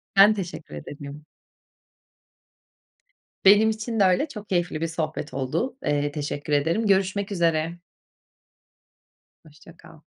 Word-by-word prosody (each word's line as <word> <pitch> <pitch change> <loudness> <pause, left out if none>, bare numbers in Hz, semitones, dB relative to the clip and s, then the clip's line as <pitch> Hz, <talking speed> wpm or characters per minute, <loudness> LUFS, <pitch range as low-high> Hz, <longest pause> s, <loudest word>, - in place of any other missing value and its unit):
Ben 200 +2 +8
teşekkür 175 - -7
ederim. 145 - -9 2.2
Benim 205 +3 +7
için 220 +1 -3
de - - +6
öyle. 185 - +3
Çok 210 -7 -10
keyifli 175 -4 -1
bir 165 - 0
sohbet 160 -2 -4
oldu. 140 - -2
Eee, 145 0 0
teşekkür 145 0 -4
ederim. 165 +10 +1
Görüşmek 195 +1 +1
üzere. 165 -2 0 1.6
Hoşça 160 +2 -17
kal. 160 - -16
170 Hz, 110 wpm, -24 LUFS, 150-200 Hz, 2.2 s, Ben